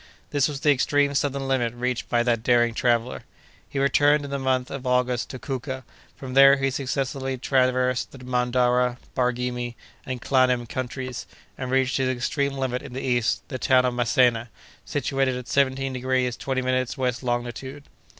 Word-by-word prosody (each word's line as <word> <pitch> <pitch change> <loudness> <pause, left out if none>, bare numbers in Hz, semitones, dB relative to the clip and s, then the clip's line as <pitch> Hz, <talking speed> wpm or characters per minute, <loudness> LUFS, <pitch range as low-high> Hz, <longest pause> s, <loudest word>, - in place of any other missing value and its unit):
This 145 -2 +2
was 145 -2 -5
the 150 - +4
extreme 140 +1 +2
southern 140 -1 -1
limit 120 -3 0
reached 125 0 -2
by 120 0 +2
that 120 -2 +1
daring 120 0 +3
traveller. 120 0 0 0.5
He - - -6
returned 145 +2 +3
in 140 - -8
the 140 - -2
month 130 -1 0
of 135 -1 -5
August 125 -2 +1
to 130 - -6
Kouka; 130 +1 -5 0.3
from 130 -2 -8
there 135 +1 +7
he 135 0 0
successively 135 0 -2
traversed 125 -1 +1
the - - -12
Mandara, 125 0 +1 0.2
Barghimi, 125 -1 -1 0.3
and 130 -1 -5
Klanem 125 -1 +2
countries, 130 0 -5 0.3
and 130 - -5
reached 130 0 +1
his 130 -1 +1
extreme 135 +3 -1
limit 130 -2 -2
in - - -10
the 130 - -5
east, 120 -4 0
the 130 - -5
town 130 0 +4
of 125 - 0
Masena, 120 -1 +2 0.4
situated 135 -1 0
at 125 -1 -7
seventeen 135 -1 +1
degrees 130 -1 0
twenty 130 0 -2
minutes 130 +1 -1
west 125 -2 -1
longitude. 125 +3 -4
130 Hz, 170 wpm, -24 LUFS, 125-135 Hz, 0.5 s, there